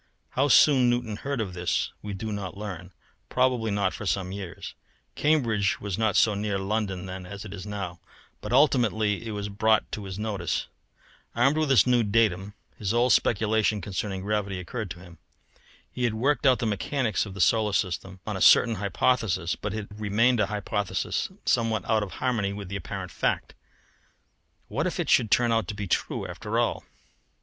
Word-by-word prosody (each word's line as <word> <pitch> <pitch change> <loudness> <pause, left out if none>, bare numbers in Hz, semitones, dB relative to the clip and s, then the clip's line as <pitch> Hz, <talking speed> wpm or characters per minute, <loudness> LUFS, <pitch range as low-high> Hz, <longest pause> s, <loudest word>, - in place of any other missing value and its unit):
How 135 +2 +2
soon 130 -2 +6
Newton 120 -3 -1
heard 140 +1 -3
of 100 -5 -3
this 90 0 -1
we 105 -1 -5
do 110 +3 -4
not 100 -2 -5
learn 95 -3 -7 0.4
probably 125 -3 +1
not 100 -2 0
for 105 - -6
some 95 -1 -1
years, 95 -3 -7 0.4
Cambridge 115 - +1
was 100 -3 -3
not 110 0 +1
so 110 - +4
near 100 0 -1
London 95 -2 -2
then 95 -1 -7
as 100 +2 -8
it 100 - -8
is 100 0 -8
now, 95 -4 -5 0.4
but 105 - -6
ultimately 115 -6 +2
it - - -4
was 105 -1 -3
brought 110 +2 +1
to 105 - -5
his 95 -1 -6
notice. 100 -6 -2 0.7
Armed 130 +5 +3
with 155 -2 +1
this 125 -8 +6
new 125 -1 +3
datum, 105 -2 +1 0.2
his 105 +1 -1
old 120 0 +4
speculation 110 -1 +2
concerning 95 -1 -4
gravity 100 -2 -2
occurred 110 +3 -5
to 90 +1 -8
him. 85 -3 -14 0.7
He 125 - -4
had 115 -2 0
worked 140 +5 +2
out 130 -1 +5
the 120 - -2
mechanics 110 +2 -1
of 95 - -9
the - - -8
solar 110 +2 +3
system 95 0 -2
on 105 - -3
a 95 - -4
certain 115 -3 +6
hypothesis, 100 -3 +1
but 105 - -4
it 105 0 -4
had 105 - -11
remained 115 +4 +3
a 100 - +2
hypothesis 105 -1 -2 0.2
somewhat 110 -4 +1
out 110 -1 +2
of 100 -3 -5
harmony 110 -6 -1
with 100 -2 -7
apparent 100 - -5
fact. - - -1 1.1
What - - -1
if - - -4
it - - 0
should 110 - +4
turn 120 +2 +3
out 115 -1 +1
to 105 - -4
be 100 0 -4
true - - -1
after - - -4
all! - - 0
105 Hz, 185 wpm, -26 LUFS, 95-115 Hz, 1.1 s, soon